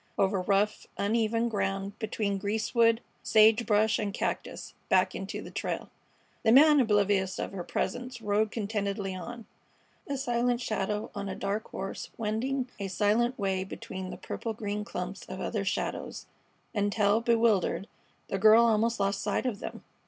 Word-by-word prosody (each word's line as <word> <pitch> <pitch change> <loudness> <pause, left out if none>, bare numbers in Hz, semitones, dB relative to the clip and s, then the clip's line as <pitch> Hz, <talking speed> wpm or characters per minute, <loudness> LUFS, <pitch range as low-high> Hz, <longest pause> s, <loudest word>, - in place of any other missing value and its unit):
Over 195 -1 +2
rough, 200 +3 +1
uneven 225 +2 +1
ground, 195 -2 -2
between 210 -3 -1
greasewood, 225 +3 +2 0.2
sage 220 +2 +5
brush, 215 +1 +3
and 210 -2 -1
cactus, - - -4 0.2
back - - +3
into - - -5
the - - -9
trail. - - -4 0.5
The 225 - +3
man, 295 +4 +7
oblivious 205 -5 +2
of - - -3
her 190 -2 -5
presence, 245 +6 -3
rode 215 0 +1
contentedly 200 -3 -2
on, 230 +5 -7 0.6
a 280 - -2
silent 245 -2 +1
shadow 210 -3 -2
on 200 -1 -4
a 190 - -4
dark 200 +3 -3
horse 195 0 -5
wending 245 +4 -1
a 200 - -2
silent 215 +6 +1
way 190 -2 0
between 190 -1 -7
the - - -7
purple 225 - -4
green 210 -1 -3
clumps 180 -1 -5
of - - -6
other - - -2
shadows, - - -3 0.5
until, 205 +1 +2
bewildered, 225 -4 +2 0.4
the 195 - -2
girl 220 +3 +7
almost 230 +1 +2
lost 195 0 0
sight - - -1
of 230 -5 -1
them. - - -7
210 Hz, 150 wpm, -29 LUFS, 200-230 Hz, 0.6 s, man